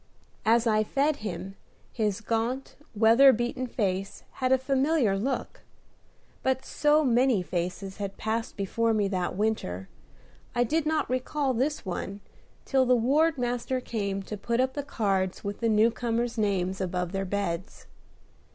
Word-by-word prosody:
As 230 Hz, +1 st, +4 dB
I 215 Hz, -1 st, +3 dB
fed 280 Hz, +6 st, +1 dB
him, 195 Hz, -3 st, -5 dB, 0.4 s
his 215 Hz, -2 st, -1 dB
gaunt, 230 Hz, +4 st, -2 dB, 0.2 s
weather 230 Hz, +6 st, +7 dB
beaten 245 Hz, +2 st, -2 dB
face 195 Hz, -4 st, -2 dB, 0.2 s
had 255 Hz, 0 st, +2 dB
a 260 Hz, -, +6 dB
familiar 265 Hz, -3 st, +2 dB
look; 255 Hz, +7 st, -3 dB, 0.8 s
but 265 Hz, 0 st, 0 dB
so 300 Hz, +1 st, +3 dB
many 245 Hz, -5 st, +3 dB
such -, -, -22 dB
faces 185 Hz, +2 st, -3 dB
had 200 Hz, -1 st, -5 dB
passed 225 Hz, +1 st, -2 dB
before 225 Hz, +3 st, 0 dB
me 205 Hz, -2 st, +2 dB
that 180 Hz, -2 st, -2 dB
winter, 185 Hz, -, -2 dB, 0.7 s
I 245 Hz, -, +3 dB
did 305 Hz, +5 st, 0 dB
not 315 Hz, 0 st, +1 dB
recall 260 Hz, +2 st, -1 dB
this 275 Hz, +4 st, -1 dB
one 195 Hz, +2 st, -4 dB, 0.4 s
till 265 Hz, -2 st, +2 dB
the 250 Hz, -, +5 dB
ward 290 Hz, +7 st, +3 dB
master 245 Hz, +1 st, -1 dB
came 200 Hz, -5 st, -3 dB
to 210 Hz, +2 st, -6 dB
put 235 Hz, +4 st, -1 dB
up 260 Hz, 0 st, +2 dB
the 290 Hz, -, -2 dB
cards 195 Hz, -9 st, -1 dB
with 200 Hz, 0 st, -4 dB
the 230 Hz, -, +1 dB
new 220 Hz, +2 st, +4 dB
comers' 235 Hz, 0 st, -1 dB
names 190 Hz, -3 st, 0 dB
above 180 Hz, -1 st, -2 dB
their 195 Hz, 0 st, -2 dB
beds. 190 Hz, -2 st, -3 dB
225 Hz, 155 wpm, -27 LUFS, 195-260 Hz, 0.8 s, weather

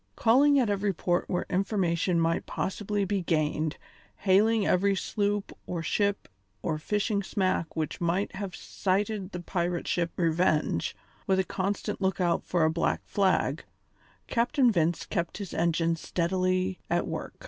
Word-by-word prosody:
Calling 280 Hz, +5 st, +5 dB
at 255 Hz, -4 st, +3 dB
every 200 Hz, -1 st, 0 dB
port 175 Hz, +1 st, -1 dB
where 180 Hz, -, -1 dB
information 180 Hz, -3 st, +1 dB
might 165 Hz, 0 st, 0 dB
possibly 205 Hz, +1 st, -2 dB
be 195 Hz, 0 st, 0 dB
gained, 155 Hz, -2 st, 0 dB, 0.4 s
hailing 210 Hz, +2 st, +3 dB
every 195 Hz, +2 st, +3 dB
sloop 205 Hz, +1 st, -1 dB
or 170 Hz, -2 st, -3 dB
ship 205 Hz, +5 st, 0 dB, 0.4 s
or 155 Hz, -2 st, -1 dB
fishing 205 Hz, +4 st, 0 dB
smack 185 Hz, -3 st, -1 dB
which 155 Hz, +1 st, -3 dB
might 175 Hz, +4 st, 0 dB
have 190 Hz, -1 st, -5 dB
sighted 195 Hz, 0 st, -1 dB
the 180 Hz, -, -5 dB
pirate 175 Hz, -1 st, -2 dB
ship 170 Hz, -1 st, 0 dB
Revenge, 160 Hz, -, +1 dB, 0.3 s
with 190 Hz, -1 st, +3 dB
a 190 Hz, -, +3 dB
constant 190 Hz, +2 st, -3 dB
lookout 185 Hz, -2 st, +1 dB
for 175 Hz, -3 st, +2 dB
a 160 Hz, -, +3 dB
black 170 Hz, -, 0 dB
flag, 185 Hz, -7 st, +1 dB, 0.6 s
Captain 245 Hz, +1 st, +2 dB
Vince 170 Hz, -3 st, +1 dB
kept 170 Hz, -4 st, -2 dB
his 200 Hz, -4 st, -6 dB
engine 165 Hz, 0 st, +1 dB
steadily 185 Hz, +2 st, 0 dB
at -, -, +1 dB
work. -, -, -5 dB
185 Hz, 145 wpm, -28 LUFS, 170-200 Hz, 0.6 s, Calling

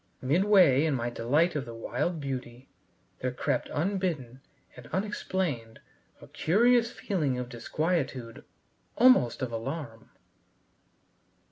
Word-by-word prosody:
Midway 170 Hz, -1 st, +5 dB
in 155 Hz, -4 st, +1 dB
my 120 Hz, -1 st, -2 dB
delight 150 Hz, +9 st, +1 dB
of 140 Hz, -4 st, -2 dB
the 115 Hz, -1 st, -8 dB
wild 165 Hz, +8 st, -2 dB
beauty, 130 Hz, -2 st, -6 dB, 0.5 s
there 130 Hz, -, -2 dB
crept 125 Hz, +1 st, -2 dB
unbidden 160 Hz, -8 st, -2 dB, 0.3 s
and 120 Hz, -2 st, -12 dB
unexplained, 185 Hz, -, -3 dB, 0.4 s
a -, -, -13 dB
curious 235 Hz, +6 st, +3 dB
feeling 150 Hz, -, -1 dB
of 125 Hz, -1 st, -4 dB
disquietude, 130 Hz, -1 st, -2 dB, 0.5 s
almost 230 Hz, -, +4 dB
of 125 Hz, -, -3 dB
alarm. 115 Hz, 0 st, -6 dB
140 Hz, 110 wpm, -28 LUFS, 120-180 Hz, 0.5 s, Midway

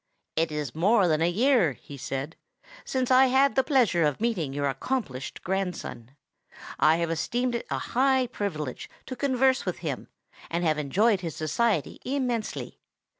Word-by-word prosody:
"It 160 Hz, 0 st, +1 dB
is 150 Hz, -4 st, -3 dB
more 195 Hz, +4 st, +3 dB
than 155 Hz, -1 st, +2 dB
a 170 Hz, -, +3 dB
year," 220 Hz, -, +3 dB
he 140 Hz, -, -12 dB
said, 135 Hz, +3 st, -5 dB, 0.5 s
"since 260 Hz, -1 st, -1 dB
I 260 Hz, +1 st, +7 dB
had 270 Hz, +2 st, +4 dB
the 265 Hz, -, +3 dB
pleasure 245 Hz, -, +3 dB
of 150 Hz, -2 st, +1 dB
meeting 210 Hz, -, -1 dB
your 140 Hz, +1 st, -1 dB
accomplished 135 Hz, -, -3 dB
grandson. 180 Hz, -10 st, -4 dB, 0.6 s
I 155 Hz, +1 st, +5 dB
have 170 Hz, 0 st, -1 dB
esteemed 240 Hz, +9 st, -1 dB
it 235 Hz, -, -3 dB
a -, -, -1 dB, 0.2 s
high 265 Hz, 0 st, +3 dB
privilege 165 Hz, -, -4 dB, 0.2 s
to 255 Hz, -, -6 dB
converse 265 Hz, -1 st, +2 dB
with -, -, -3 dB
him, -, -, -3 dB, 0.4 s
and 170 Hz, +1 st, -1 dB
have 155 Hz, -2 st, +2 dB
enjoyed 195 Hz, -, +2 dB
his 165 Hz, -5 st, -5 dB
society 160 Hz, +3 st, 0 dB
immensely. 250 Hz, -5 st, -3 dB
190 Hz, 160 wpm, -27 LUFS, 155-250 Hz, 0.6 s, I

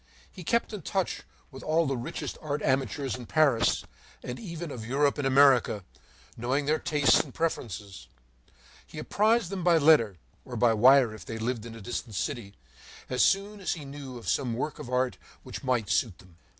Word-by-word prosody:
He 185 Hz, -, -10 dB
kept 235 Hz, +5 st, 0 dB
in 205 Hz, -, -5 dB
touch 190 Hz, +3 st, -2 dB, 0.3 s
with 135 Hz, -1 st, -10 dB
all 160 Hz, +4 st, +1 dB
the 135 Hz, -1 st, -1 dB
richest 120 Hz, -, -5 dB
art 150 Hz, -1 st, -3 dB
amateurs 135 Hz, +1 st, 0 dB
in 125 Hz, -2 st, -7 dB
Paris, 150 Hz, -7 st, +3 dB, 0.4 s
and 125 Hz, -, -6 dB
even 170 Hz, -6 st, -6 dB
of 120 Hz, -5 st, -6 dB
Europe 140 Hz, +5 st, +1 dB
and 140 Hz, -, +1 dB
America, 130 Hz, -7 st, +4 dB, 0.5 s
knowing 130 Hz, +5 st, -1 dB
their 155 Hz, +2 st, +1 dB
tastes 145 Hz, -2 st, +3 dB
and 145 Hz, -, -3 dB
preferences; 105 Hz, -, -4 dB, 0.8 s
he -, -, -12 dB
apprised 215 Hz, -2 st, +1 dB
them 190 Hz, -3 st, -3 dB
by 170 Hz, -1 st, +5 dB
letter, 140 Hz, -, +4 dB, 0.3 s
or -, -, -8 dB
by 120 Hz, -2 st, +3 dB
wire 125 Hz, +1 st, +6 dB
if 110 Hz, -, -10 dB
they 115 Hz, -, -6 dB
lived 115 Hz, 0 st, -3 dB
in 115 Hz, -, -9 dB
a 115 Hz, -, -10 dB
distant 110 Hz, 0 st, -5 dB
city, 100 Hz, -3 st, -4 dB, 0.6 s
as 125 Hz, -, +3 dB
soon 200 Hz, +2 st, +1 dB
as 190 Hz, -, -1 dB
he 155 Hz, -4 st, -8 dB
knew 135 Hz, -2 st, -8 dB
of 115 Hz, -, -11 dB
some 125 Hz, -5 st, 0 dB
work 145 Hz, +5 st, -3 dB
of -, -, -7 dB
art 125 Hz, 0 st, 0 dB, 0.2 s
which 130 Hz, -, -8 dB
might 125 Hz, -5 st, 0 dB
suit 105 Hz, -3 st, 0 dB
them. 90 Hz, -2 st, -19 dB
135 Hz, 190 wpm, -28 LUFS, 120-155 Hz, 0.8 s, wire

